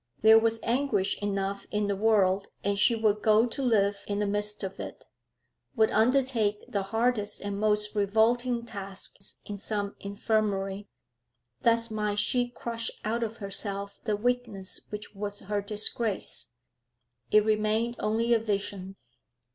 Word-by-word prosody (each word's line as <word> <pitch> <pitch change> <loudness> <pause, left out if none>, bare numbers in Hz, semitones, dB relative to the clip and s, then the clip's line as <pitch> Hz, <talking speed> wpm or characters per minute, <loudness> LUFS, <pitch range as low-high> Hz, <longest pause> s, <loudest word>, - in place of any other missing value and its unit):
There 220 +1 +8
was 225 0 +2
anguish 230 -6 +1
enough 200 -1 -2
in 210 0 0
the 200 0 0
world, 195 -2 +3 0.2
and 200 0 0
she 230 - +5
would 215 -2 +1
go 215 +1 +5
to 245 +3 -4
live 205 -5 +2
in 205 - -1
the 210 - +1
midst 205 +1 -1
of 195 0 -5
it, - - -7 0.7
would 220 -2 +3
undertake 230 -3 +2
the 200 - -1
hardest 225 +1 0
and 200 0 -4
most 210 0 +2
revolting 235 +4 +2
tasks 195 -2 -7
in 205 -1 -6
some 205 -1 -3
infirmary: 200 -1 -1 0.7
thus 230 0 +2
might 210 -1 -1
she 245 +3 +2
crush 230 -1 -4 0.2
out 230 +2 0
of 230 0 -3
herself 200 0 -2
the 215 -2 +1
weakness 225 -4 -2
which 210 0 -7
was 205 0 -4
her 205 +1 -2
disgrace. 210 +1 -1 0.8
It 215 0 +5
remained 220 +2 +1
only 230 +2 +1
a 230 - +4
vision. 200 -3 -3
210 Hz, 145 wpm, -28 LUFS, 200-225 Hz, 0.8 s, There